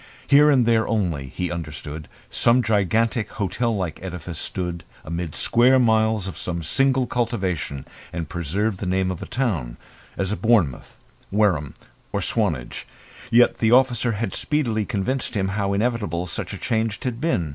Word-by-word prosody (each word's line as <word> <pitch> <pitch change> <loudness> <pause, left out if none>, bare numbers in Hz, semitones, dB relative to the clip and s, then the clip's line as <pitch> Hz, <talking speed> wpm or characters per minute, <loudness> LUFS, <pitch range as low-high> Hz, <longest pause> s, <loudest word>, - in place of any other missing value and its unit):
Here 145 +2 +6
and 130 -5 +4
there 115 -1 +3
only, 85 -11 -1
he 90 +7 -4
understood, 75 -2 -6 0.2
some 120 +1 +3
gigantic 110 +2 +1
hotel 110 +4 -1
like 90 -6 -3
edifice 90 -3 -5
stood 90 -2 -3 0.2
amid 85 -1 -4
square 125 +3 +4
miles 110 -4 +3
of 95 - -6
some 85 -2 -3
single 130 - +2
cultivation 95 - -2 0.3
and 85 -2 -4
preserved 95 +5 -2
the 95 - -3
name 95 0 +1
of 90 - -6
a - - -6
town 90 - -2 0.4
as 95 +2 -1
Bournemouth, 105 - +1 0.3
Wareham, 95 -9 +1 0.4
or - - -1
Swanage. - - -1 0.4
Yet 120 +1 +4
the 110 -1 +3
officer 125 -2 +3
had 105 -1 -3
speedily 115 -8 0
convinced 125 +4 -2
him 95 -2 0
how 100 0 -1
inevitable 105 -5 -1
such 85 - -4
a - - -5
change 110 -1 -1
had 125 -2 -3
been. 100 - 0
100 Hz, 155 wpm, -23 LUFS, 85-115 Hz, 0.4 s, Here